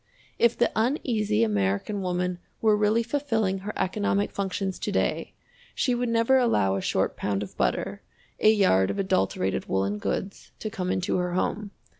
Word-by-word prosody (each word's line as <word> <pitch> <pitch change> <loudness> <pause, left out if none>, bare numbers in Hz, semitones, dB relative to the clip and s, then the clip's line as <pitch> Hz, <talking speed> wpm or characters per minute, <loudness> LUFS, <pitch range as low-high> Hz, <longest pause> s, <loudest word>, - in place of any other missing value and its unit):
If 235 0 +3
the 240 - +2
Uneasy 220 - +1
American 105 - 0
Woman 180 -1 -1 0.2
were 215 -1 +4
really 215 +2 +2
fulfilling 225 -7 -1
her 205 +2 -6
economic 205 +1 0
functions 195 -1 -3
to - - -3
day, - - -1 0.4
she 250 - +1
would 245 0 -1
never 230 +3 +3
allow 105 - +2
a 95 - -2
short - - 0
pound 100 0 -2
of 100 - -10
butter, - - -1 0.4
a 215 - +6
yard 185 - +3
of - - -3
adulterated 95 - 0
woolen 100 +2 0
goods, 195 - -4
to 215 - -5
come 185 -4 -3
into 185 0 0
her 180 -1 -1
home. 205 +2 -1
195 Hz, 165 wpm, -26 LUFS, -, 0.4 s, a